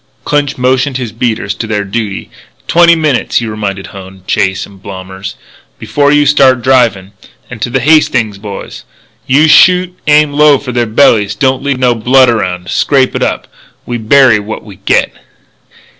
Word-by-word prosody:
Clinch 145 Hz, -1 st, -1 dB
motioned 130 Hz, +1 st, 0 dB
his 125 Hz, -4 st, -5 dB
beaters 110 Hz, -3 st, -2 dB
to 115 Hz, -, -6 dB
their 105 Hz, -2 st, -2 dB
duty. 100 Hz, 0 st, -5 dB, 0.4 s
"Twenty 170 Hz, 0 st, +4 dB
minutes," 155 Hz, -6 st, -1 dB
he 120 Hz, -, +1 dB
reminded 100 Hz, -3 st, -5 dB
Hone, 95 Hz, -1 st, -12 dB
Chase, 95 Hz, 0 st, -1 dB
and 100 Hz, -2 st, -18 dB
Blommers, 95 Hz, 0 st, -8 dB, 0.4 s
"before 145 Hz, -1 st, 0 dB
you 145 Hz, 0 st, +3 dB
start 135 Hz, -4 st, +3 dB
drivin'." 115 Hz, -7 st, +1 dB, 0.4 s
And, 115 Hz, -4 st, -9 dB
to 120 Hz, -, -2 dB
the 130 Hz, +1 st, -1 dB
Hastings 130 Hz, -8 st, +1 dB
boys: 100 Hz, -1 st, -9 dB, 0.4 s
"If 130 Hz, -, +1 dB
you 155 Hz, +3 st, +4 dB
shoot, 180 Hz, +3 st, +4 dB
aim 150 Hz, -1 st, +3 dB
low 150 Hz, -1 st, +4 dB
for 130 Hz, -1 st, -7 dB
their 120 Hz, -1 st, -1 dB
bellies. 110 Hz, -3 st, +2 dB
Don't 130 Hz, +4 st, 0 dB
leave 140 Hz, -1 st, -2 dB
no 125 Hz, -1 st, +2 dB
blood 125 Hz, +2 st, +3 dB
around. 90 Hz, -5 st, -3 dB
Scrape 135 Hz, -3 st, +1 dB
it -, -, -3 dB
up. -, -, -2 dB, 0.4 s
We 120 Hz, -1 st, -4 dB
bury 115 Hz, 0 st, +4 dB
what 105 Hz, +1 st, -7 dB
we 100 Hz, -4 st, -13 dB
get." -, -, 0 dB
120 Hz, 170 wpm, -11 LUFS, 105-140 Hz, 0.4 s, Twenty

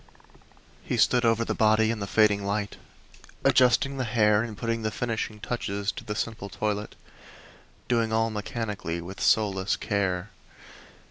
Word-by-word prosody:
He -, -, -2 dB
stood 125 Hz, -1 st, +3 dB
over 115 Hz, 0 st, +2 dB
the -, -, -1 dB
body 110 Hz, 0 st, +3 dB
in 115 Hz, -, -3 dB
the 100 Hz, -, -4 dB
fading 105 Hz, -1 st, +3 dB
light, 100 Hz, +1 st, -2 dB, 0.7 s
adjusting 130 Hz, +2 st, +4 dB
the 130 Hz, -, -1 dB
hair 110 Hz, -3 st, +3 dB
and 110 Hz, -3 st, -5 dB
putting 115 Hz, 0 st, -2 dB
the 110 Hz, -, -1 dB
finishing 110 Hz, -1 st, -3 dB
touches 100 Hz, -3 st, -2 dB
to -, -, -9 dB
the 105 Hz, -, -4 dB
simple 110 Hz, -2 st, -4 dB
toilet, 105 Hz, 0 st, -3 dB, 0.9 s
doing 115 Hz, -2 st, +1 dB
all 115 Hz, 0 st, +1 dB
mechanically, 105 Hz, -5 st, -4 dB
with 90 Hz, +3 st, -8 dB
soulless 100 Hz, -3 st, +2 dB
care. 100 Hz, -2 st, -2 dB
110 Hz, 145 wpm, -27 LUFS, 100-115 Hz, 0.9 s, adjusting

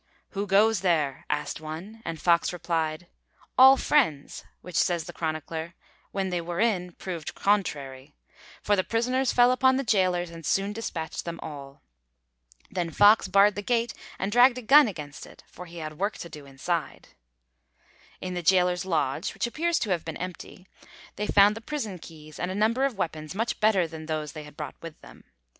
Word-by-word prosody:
'Who 200 Hz, +1 st, -3 dB
goes 210 Hz, +2 st, +4 dB
there?' 155 Hz, -7 st, 0 dB
asked 150 Hz, +1 st, -2 dB
one, 170 Hz, +9 st, -8 dB
and 165 Hz, -1 st, -4 dB
Fox 170 Hz, +1 st, +3 dB
replied: 165 Hz, -2 st, -2 dB, 0.5 s
'All 265 Hz, +1 st, +8 dB
friends,' 160 Hz, -, +1 dB, 0.2 s
which, 180 Hz, -, -11 dB
says 175 Hz, -2 st, +2 dB
the -, -, -9 dB
chronicler, 160 Hz, +1 st, -4 dB, 0.4 s
'when 190 Hz, -1 st, -2 dB
they 175 Hz, -1 st, -1 dB
were 170 Hz, +1 st, -5 dB
in, 185 Hz, -6 st, 0 dB
proved 170 Hz, -4 st, -6 dB
contrary,' 145 Hz, -9 st, -1 dB, 0.5 s
for 205 Hz, -, +3 dB
the 185 Hz, -, +1 dB
prisoners 250 Hz, +4 st, 0 dB
fell 245 Hz, 0 st, +5 dB
upon 260 Hz, +1 st, +3 dB
the 270 Hz, -, -1 dB
gaolers 185 Hz, -6 st, +1 dB
and 165 Hz, -1 st, -10 dB
soon 195 Hz, +6 st, 0 dB
dispatched 170 Hz, -7 st, -5 dB
them 170 Hz, -1 st, -6 dB
all. 140 Hz, -3 st, -9 dB, 0.9 s
Then 175 Hz, -2 st, -2 dB
Fox 205 Hz, +6 st, +5 dB
barred 200 Hz, +1 st, +5 dB
the 205 Hz, -, -4 dB
gate 235 Hz, +1 st, 0 dB, 0.2 s
and 195 Hz, +2 st, -2 dB
dragged 245 Hz, +2 st, +6 dB
a 250 Hz, -, -6 dB
gun 285 Hz, +4 st, +7 dB
against 150 Hz, -8 st, -7 dB
it, -, -, -16 dB
for 180 Hz, -, -11 dB
he 170 Hz, 0 st, -11 dB
had 155 Hz, -2 st, -7 dB
work 205 Hz, +3 st, -1 dB
to 170 Hz, -, -8 dB
do 150 Hz, -3 st, -11 dB
inside. 150 Hz, +5 st, -4 dB, 1.1 s
In 185 Hz, 0 st, -5 dB
the 175 Hz, -, -3 dB
gaoler's 180 Hz, +1 st, +2 dB
lodge, 155 Hz, -4 st, -1 dB
which -, -, -1 dB
appears 330 Hz, +7 st, 0 dB
to 210 Hz, -, -2 dB
have 175 Hz, -3 st, 0 dB
been 165 Hz, -1 st, -6 dB
empty, 185 Hz, 0 st, -8 dB, 0.5 s
they 210 Hz, +1 st, -3 dB
found 205 Hz, +1 st, +5 dB
the 225 Hz, -, -8 dB
prison 225 Hz, -9 st, -5 dB
keys 155 Hz, -2 st, -12 dB
and 180 Hz, -, -2 dB
a 185 Hz, -, -4 dB
number 225 Hz, +6 st, +2 dB
of 265 Hz, -7 st, -2 dB
weapons 160 Hz, -2 st, -4 dB
much 225 Hz, +3 st, -2 dB
better 210 Hz, -4 st, +3 dB
than 160 Hz, -1 st, -9 dB
those 155 Hz, -2 st, -3 dB
they 155 Hz, -1 st, -9 dB
had 150 Hz, 0 st, -15 dB
brought 150 Hz, -3 st, -7 dB
with 165 Hz, -2 st, -9 dB
them. -, -, -15 dB
180 Hz, 185 wpm, -26 LUFS, 160-210 Hz, 1.1 s, All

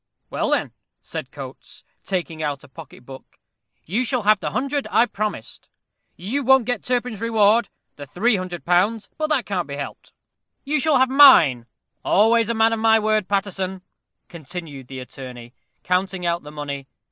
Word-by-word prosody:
"Well, -, -, -1 dB
then," -, -, 0 dB, 0.3 s
said -, -, -6 dB
Coates, -, -, -11 dB, 0.2 s
taking 170 Hz, -4 st, -3 dB
out 145 Hz, -2 st, -3 dB
a -, -, -14 dB
pocket 135 Hz, -3 st, -13 dB
book, 135 Hz, 0 st, -13 dB, 0.5 s
"you 215 Hz, +10 st, -1 dB
shall 250 Hz, -2 st, -1 dB
have 210 Hz, 0 st, +4 dB
the -, -, -3 dB
hundred 275 Hz, +2 st, -2 dB
I 235 Hz, -, +4 dB
promised. 215 Hz, -2 st, -5 dB, 0.5 s
You 230 Hz, +11 st, -3 dB
won't 265 Hz, -1 st, +5 dB
get 245 Hz, -3 st, -2 dB
Turpin's 245 Hz, -3 st, -2 dB
reward, 225 Hz, -1 st, +3 dB, 0.3 s
the 145 Hz, -1 st, -9 dB
three 220 Hz, -, +1 dB
hundred 185 Hz, -3 st, -5 dB
pounds; 200 Hz, +5 st, +1 dB
but 310 Hz, -, 0 dB
that 280 Hz, -6 st, +1 dB
can't 180 Hz, -4 st, -2 dB
be 140 Hz, -, -6 dB
helped. 140 Hz, 0 st, -8 dB, 0.5 s
You 300 Hz, +2 st, 0 dB
shall 300 Hz, 0 st, +3 dB
have 260 Hz, 0 st, +3 dB
mine 170 Hz, -, +7 dB, 0.4 s
always 225 Hz, +2 st, +3 dB
a 235 Hz, -, 0 dB
man 225 Hz, +1 st, +3 dB
of 225 Hz, -, -2 dB
my 225 Hz, 0 st, +5 dB
word, 215 Hz, -2 st, +1 dB
Paterson," 190 Hz, -1 st, -2 dB, 0.4 s
continued 160 Hz, -5 st, -9 dB
the 130 Hz, -, -8 dB
attorney, 125 Hz, -2 st, -10 dB, 0.3 s
counting 180 Hz, 0 st, -1 dB
out 170 Hz, 0 st, 0 dB
the 150 Hz, -, -11 dB
money. 140 Hz, -2 st, -6 dB
195 Hz, 170 wpm, -22 LUFS, 155-230 Hz, 0.5 s, mine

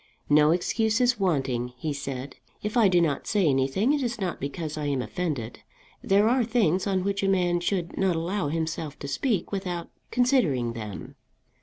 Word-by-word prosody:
"No 150 Hz, 0 st, +6 dB
excuse 215 Hz, +6 st, +1 dB
is 245 Hz, -2 st, +2 dB
wanting," 135 Hz, -9 st, 0 dB
he 150 Hz, +4 st, -3 dB
said. 135 Hz, -1 st, -6 dB, 0.3 s
"If 210 Hz, 0 st, -3 dB
I 230 Hz, -4 st, +6 dB
do 180 Hz, -2 st, +4 dB
not 155 Hz, -5 st, 0 dB
say 205 Hz, -4 st, +2 dB
anything 140 Hz, -, +2 dB
it 295 Hz, -, 0 dB
is 240 Hz, -3 st, -2 dB
not 185 Hz, -3 st, -2 dB
because 155 Hz, +2 st, -4 dB
I 150 Hz, -1 st, -3 dB
am 140 Hz, -2 st, 0 dB
offended. 135 Hz, -6 st, -3 dB, 0.4 s
There 200 Hz, +2 st, +3 dB
are 250 Hz, +2 st, +3 dB
things 210 Hz, -6 st, +1 dB
on 190 Hz, -2 st, +1 dB
which 200 Hz, +1 st, -1 dB
a 195 Hz, -, +1 dB
man 175 Hz, -2 st, +2 dB
should 175 Hz, -1 st, -2 dB
not 190 Hz, -3 st, +2 dB
allow 175 Hz, +2 st, -1 dB
himself 160 Hz, -1 st, -3 dB
to 140 Hz, -, -7 dB
speak 190 Hz, -, -1 dB
without 180 Hz, -4 st, -4 dB, 0.2 s
considering 185 Hz, -, +2 dB
them." 105 Hz, -4 st, -7 dB
175 Hz, 180 wpm, -26 LUFS, 145-205 Hz, 0.4 s, No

